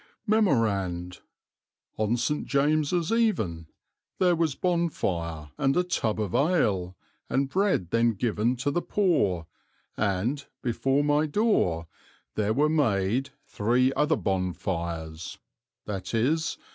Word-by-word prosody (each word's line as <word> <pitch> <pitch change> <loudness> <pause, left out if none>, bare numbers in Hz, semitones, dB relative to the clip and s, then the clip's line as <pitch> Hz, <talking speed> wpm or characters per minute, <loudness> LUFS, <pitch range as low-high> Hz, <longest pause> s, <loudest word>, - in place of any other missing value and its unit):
"Memorand. 100 - +1 0.8
On 110 +2 0
St. 150 +5 -1
James's 155 +5 +1
Even, 110 - 0 0.5
there 180 -2 +3
was 160 -4 0
bonefire, 85 - -1
and 135 +3 +2
a 180 - +4
tub 110 -11 -1
of 105 -4 -2
ale, 105 - +1 0.3
and 135 +1 +1
bread 185 - +1
then 115 0 +3
given 110 +3 0
to 130 +3 -1
the 175 - 0
poor, 105 - +1 0.5
and, 110 +8 -1 0.2
before 135 +4 +1
my 150 +1 +2
doore, 145 - +1 0.5
there 105 0 0
were 145 +7 +3
made, 130 -4 +1 0.2
three 125 +5 +1
other 150 +2 +2
bonefires, 85 -4 -3 0.5
viz. 115 - -1
120 Hz, 110 wpm, -27 LUFS, 95-155 Hz, 0.8 s, a